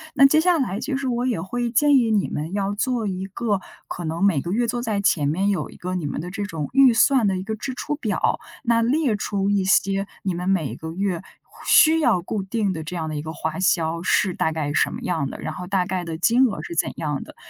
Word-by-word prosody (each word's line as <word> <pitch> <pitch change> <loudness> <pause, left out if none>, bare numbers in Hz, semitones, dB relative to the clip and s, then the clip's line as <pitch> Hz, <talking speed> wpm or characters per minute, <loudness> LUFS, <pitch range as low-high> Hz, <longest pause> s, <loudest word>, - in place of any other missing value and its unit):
那 275 - +7
接 310 +3 +5
下 355 -1 +3
来 210 -7 -1
就 275 -3 -2
是 275 -1 -3
我 245 0 -1
也 235 -8 0
会 235 +7 -2
建 285 +4 +4
议 235 -3 +2
你 210 -2 +2
们 155 +3 -4
要 200 0 -1
做 235 +1 -1
一 190 -1 -3
个 200 0 -2 0.3
可 175 - -6
能 165 +4 -2
每 170 -9 +3
个 170 - -5
月 235 +5 +1
坐 240 +1 -2
在 215 -4 -1
前 165 -7 +2
面 190 +7 +1
有 195 - -1
一 - - -14
个 180 +1 -4
你 170 -5 -2
们 - - -4
的 180 +3 -6
这 205 +1 -4
种 160 -7 -4
预 270 -3 +6
算 260 -3 +4
的 190 -1 0
一 185 - -4
个 220 +1 -3
支 255 +4 -5
出 295 +4 -3
表， 305 - -1 0.2
那 230 -2 +2
列 260 0 +1
出 200 -1 -1
一 200 -1 +2
些 195 +1 +2 0.2
你 190 -2 -1
们 180 +2 -3
每 175 -7 0
个 160 0 -7
月 185 -1 -2 0.5
需 320 0 +6
要 240 - +3
固 200 +3 -3
定 200 0 -1
的 160 -1 -5
这 175 +3 -6
样 160 -2 -3
的 155 - -4
一 145 - -3
个 160 +1 -6
花 160 +1 -4
销 170 -2 +1
是 185 +1 +2
大 160 - 0
概 150 -2 -2
什 - - +2
么 - - -6
样 160 -6 -1
的， - - -8
然 155 - -4
后 180 +2 -7
大 190 -2 +1
概 185 -1 -2
的 165 -2 -5
金 240 +8 +4
额 205 - -4
是 170 - -6
怎 - - +1
样 150 -3 -3
的， - - -14
195 Hz, 280 characters per minute, -23 LUFS, 170-235 Hz, 0.5 s, 那